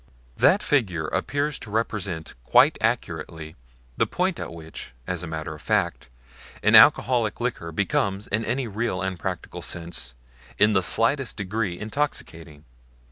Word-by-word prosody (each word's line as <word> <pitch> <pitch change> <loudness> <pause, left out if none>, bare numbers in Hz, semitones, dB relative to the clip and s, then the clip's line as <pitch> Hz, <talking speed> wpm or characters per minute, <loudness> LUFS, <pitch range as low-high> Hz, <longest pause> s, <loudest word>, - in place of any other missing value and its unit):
That - - +4
figure 95 - +1
appears 145 - -1
to - - -9
represent 100 -7 -2
quite - - +5
accurately 80 0 -2 0.4
the - - +2
point 185 0 -1
at - - -5
which, 80 -6 -9
as 90 +1 -2
a 85 - -5
matter 80 -1 -5
of 75 - -11
fact, 95 - 0 0.5
an - - +4
alcoholic 120 -4 +6
liquor 120 -9 -3
becomes 100 +3 0
in 105 +3 -1
any 125 +3 -1
real 105 -3 -2
and 95 -2 -3
practical - - -5
sense 80 -8 -4 0.4
in 105 +1 +4
the 95 - +3
slightest 115 +7 +2
degree 100 -2 -2
intoxicating. 85 - -4
100 Hz, 140 wpm, -25 LUFS, 85-115 Hz, 0.5 s, alcoholic